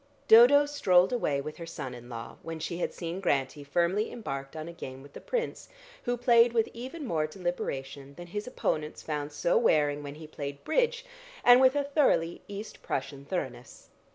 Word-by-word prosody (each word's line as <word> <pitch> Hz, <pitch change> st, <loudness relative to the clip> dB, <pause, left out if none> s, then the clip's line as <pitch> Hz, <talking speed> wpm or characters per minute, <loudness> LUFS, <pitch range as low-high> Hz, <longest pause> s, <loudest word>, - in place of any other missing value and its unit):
Dodo 250 Hz, +6 st, +8 dB
strolled 190 Hz, -9 st, +3 dB
away 145 Hz, -, 0 dB
with 155 Hz, +2 st, -7 dB
her 170 Hz, -, -7 dB
son 140 Hz, -6 st, -6 dB
in 120 Hz, 0 st, -11 dB
law 115 Hz, -1 st, -7 dB
when 165 Hz, 0 st, -6 dB
she 170 Hz, +2 st, -4 dB
had 180 Hz, -, -1 dB
seen 170 Hz, +1 st, -5 dB
Grantie 140 Hz, -4 st, 0 dB
firmly 175 Hz, +8 st, 0 dB
embarked 135 Hz, -, -6 dB
on 155 Hz, 0 st, -6 dB
a 170 Hz, -, -7 dB
game 135 Hz, -5 st, -8 dB
with 140 Hz, -, -15 dB
the -, -, -9 dB
Prince, 480 Hz, -1 st, -3 dB, 0.4 s
who 245 Hz, 0 st, 0 dB
played 235 Hz, -1 st, +5 dB
with 225 Hz, -2 st, +2 dB
even 260 Hz, +6 st, -7 dB
more 155 Hz, -9 st, 0 dB
deliberation 140 Hz, -5 st, -5 dB
than 175 Hz, -, -9 dB
his 205 Hz, +6 st, -5 dB
opponents 155 Hz, -10 st, -2 dB
found 150 Hz, -1 st, -3 dB
so 150 Hz, +3 st, +2 dB
wearing 145 Hz, -1 st, +2 dB
when 145 Hz, 0 st, -7 dB
he 155 Hz, +1 st, -10 dB
played 140 Hz, -2 st, -7 dB
bridge, 485 Hz, +7 st, +1 dB, 0.4 s
and 245 Hz, +1 st, +8 dB
with 260 Hz, +1 st, +5 dB
a 285 Hz, -, +2 dB
thoroughly 275 Hz, -, +1 dB
East 205 Hz, +2 st, -8 dB
Prussian 140 Hz, +1 st, -4 dB
thoroughness. 130 Hz, -7 st, -5 dB
170 Hz, 185 wpm, -29 LUFS, 145-235 Hz, 0.4 s, Dodo